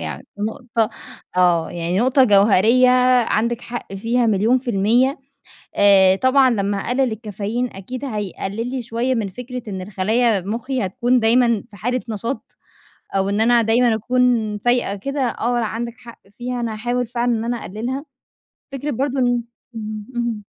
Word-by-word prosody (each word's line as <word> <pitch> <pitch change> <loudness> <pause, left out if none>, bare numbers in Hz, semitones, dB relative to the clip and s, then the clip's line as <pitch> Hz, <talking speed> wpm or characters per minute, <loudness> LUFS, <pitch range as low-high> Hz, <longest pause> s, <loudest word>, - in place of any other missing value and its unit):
يعني 80 -4 -6
نقطة 225 +1 -1 0.5
آه، 175 -2 +3
يعني 175 +2 -2
نقطة 260 +3 +4
جوهريّة 215 +4 +5 0.4
عَندِك 235 +2 0
حق 240 -5 -7
فيها 230 +5 0
مليون 220 +4 +3
في 250 -1 -4
المِيَّة 235 +7 +2 0.6
آآ، 195 -2 +6
طبعًا 260 +4 +4
لمّا 200 -3 0
أقلّل 245 +4 0
الكافيين 220 +3 -3
أكيد 250 +8 -7
هيقلّل 210 0 -4
لي 260 0 -3
شوية 240 +2 -1
من 215 -4 -2
فكرة 250 +4 -7
إن 190 -2 -5
الخلايا 210 +3 +1
مُخّي 230 +5 -3
هتكون 245 +6 +1
دايمًا 235 -1 +3
في 210 - -15
حالة 245 +6 -1
نشاط، 230 +5 -5 0.6
أو 195 0 +1
إن 205 +2 0
أنا 235 +1 +4
دايمًا 230 +1 +3
أكون 235 -2 +1
فايقة 240 -2 +1
كده. 275 +8 -4
آه، 245 -1 0
عَندِك 235 +1 -3
حق 240 -2 -13 0.2
فيها، 245 0 -4
أنا 230 -2 -2
هاحاول 240 +3 -2
فعلًا 240 +1 -1
إن 225 -1 -1
أنا 240 +1 -1
أقلّلها. 240 - -5 0.7
فكرة 275 +2 -4
برضه 270 +2 -1
إن 245 -1 +1 0.3
امم، 215 -1 -6
اهم 235 -3 -2
230 Hz, 155 wpm, -20 LUFS, 205-250 Hz, 0.7 s, آآ